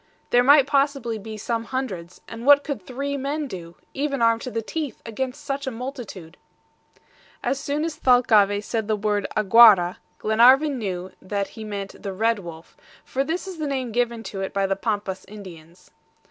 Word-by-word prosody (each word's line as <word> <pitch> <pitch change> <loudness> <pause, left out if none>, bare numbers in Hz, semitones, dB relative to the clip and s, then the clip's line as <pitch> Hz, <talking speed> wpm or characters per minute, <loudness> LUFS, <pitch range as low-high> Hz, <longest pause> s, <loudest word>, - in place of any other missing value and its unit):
There 245 0 +5
might 280 +1 +7
possibly 275 -5 0
be 215 +1 -8
some 230 +2 -3
hundreds, 190 -10 -5
and 230 +1 -8
what 285 +2 +6
could 285 -8 -4
three 275 +8 -4
men 285 +3 -2
do, 175 -8 -8 0.2
even 280 -1 -2
armed 230 0 +3
to 255 - -5
the 230 -2 -3
teeth, 305 +2 -4
against 260 +5 -5
such 275 0 -3
a - - +2
multitude? 230 - -8 1.1
As 270 - 0
soon 285 +2 -2
as 320 -2 -4
Thalcave 215 -6 +4
said 220 -1 -3
the 215 - +1
word 205 -1 -1
AGUARA, 210 -4 +6 0.2
Glenarvan 255 +6 +4
knew 185 -3 -4
that 200 +1 -3
he 220 - -9
meant 200 -2 -6
the 195 -2 -5
red 225 +3 +1
wolf, 170 -3 -11 0.3
for 270 - -1
this 335 +6 -3
is 370 -4 -8
the 305 - -2
name 260 -4 -2
given 235 0 -1
to 195 -1 -6
it 195 - -5
by 195 0 +2
the 195 0 0
Pampas 200 -2 -3
Indians. 180 -5 -13
230 Hz, 180 wpm, -23 LUFS, 200-275 Hz, 1.1 s, might